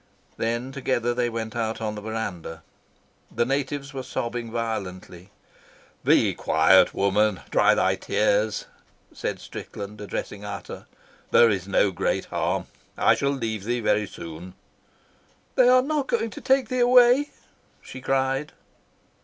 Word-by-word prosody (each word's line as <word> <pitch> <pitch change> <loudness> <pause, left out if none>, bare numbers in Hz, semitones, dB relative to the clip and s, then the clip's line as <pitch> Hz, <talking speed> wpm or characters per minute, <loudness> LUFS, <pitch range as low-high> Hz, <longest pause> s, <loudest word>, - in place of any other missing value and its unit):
Then 120 +3 -2
together 125 -3 -1
they 120 0 0
went 115 0 -5
out 115 -1 -2
on 110 -1 -3
the 105 - -7
verandah. 95 -7 -5 0.7
The 120 - 0
natives 140 +2 -2
were 135 - -4
sobbing 120 -2 -4
violently. 100 -5 -5 0.7
"Be - - +4
quiet, 80 +4 +4
woman. 100 0 +2
Dry - - +4
thy - - +2
tears," 105 0 0 0.5
said - - -4
Strickland, 105 +1 -8
addressing 105 0 -5
Ata. 100 -1 -7 0.4
"There 115 -2 +6
is 95 -2 -2
no 100 0 +2
great 90 - -1
harm. - - -1 0.3
I - - +5
shall 140 - 0
leave 115 -7 -3
thee 120 +3 -1
very 105 -2 +1
soon." 85 +1 -9 1.0
"They 255 -2 +5
are 255 0 +6
not 290 -1 -1
going 230 -1 -1
to - - -9
take 265 -3 +2
thee 255 - -1
away?" 250 +3 +5 0.5
she 130 - -10
cried. 135 +2 0
115 Hz, 135 wpm, -25 LUFS, 105-135 Hz, 1.0 s, There